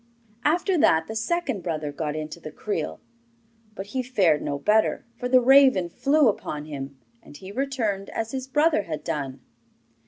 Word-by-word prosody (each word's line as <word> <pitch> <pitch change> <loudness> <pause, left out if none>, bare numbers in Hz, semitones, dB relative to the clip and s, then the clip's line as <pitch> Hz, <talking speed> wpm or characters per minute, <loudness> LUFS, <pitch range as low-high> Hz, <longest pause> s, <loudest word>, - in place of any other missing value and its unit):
After 345 +4 +2
that 160 - +4
the 220 - -7
second 230 - -1
brother 155 -4 -3
got 150 0 -3
into 155 +2 -6
the 155 - -8
creel; 205 +7 -4 0.8
but 195 - -6
he 260 - 0
fared 190 - +2
no 140 - -2
better, 210 +9 +2
for 245 +1 -4
the 255 0 +6
raven 260 -8 +5
flew 285 - +3
upon 150 -8 -2
him, 140 -2 -7 0.2
and 145 - -14
he 190 +5 -10
returned 230 -6 -2
as 225 0 -4
his 265 -1 -4
brother 295 -1 +3
had 155 -5 -6
done. 135 -3 -4
205 Hz, 165 wpm, -25 LUFS, -, 0.8 s, the